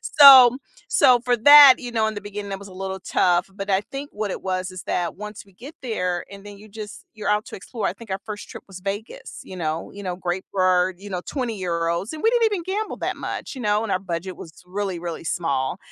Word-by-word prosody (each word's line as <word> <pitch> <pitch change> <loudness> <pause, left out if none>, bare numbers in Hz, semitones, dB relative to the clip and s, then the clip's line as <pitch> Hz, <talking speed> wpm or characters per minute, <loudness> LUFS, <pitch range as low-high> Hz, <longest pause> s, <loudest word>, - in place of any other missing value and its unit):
So 265 -4 +8 0.3
so 255 -6 +5
for 245 -1 +2
that 285 +2 +10
you 245 - -7
know, 220 -2 +1
in 220 - -2
the 205 - -5
beginning 205 0 -7
it 195 - -4
was 200 - -11
a - - -13
little 190 0 -5
tough, 175 0 +1
but 195 0 -6
I 190 0 +3
think 275 +1 -6
what 210 -1 -3
it - - -5
was 185 0 -3
is 185 -1 -9
that 175 -2 -2
once 210 +1 -8
we 195 - -22
get 270 - -11
there, 180 -8 -2
and 200 0 -12
then 205 0 -10
you 215 +2 -15
just 210 0 -9
you're 215 - -5
out 210 +1 0
to - - -8
explore, 215 +3 -4
I - - -4
think 230 -3 -14
our 190 - -3
first 210 -1 -7
trip - - -10
was 190 -2 -10
Vegas, 200 +4 -6
you 185 - -10
know 160 -1 -3
you 200 - -9
know, 180 -1 -3
great 180 +1 -3
for 185 -1 +2
you 200 +1 -11
know, 180 -2 -3
€20 185 - -2
and 310 - -8
we 450 - +4
didn't 475 -1 +2
even 410 -5 -1
gamble 410 +4 -3
that - - -3
much, - - -6
you - - -6
know, 210 0 +1
and 220 - -4
our - - +1
budget 180 0 -5
was 160 - -11
really, 190 -1 -3
really 170 -1 -6
small, 140 -2 -2
200 Hz, 250 wpm, -23 LUFS, 185-230 Hz, 0.3 s, that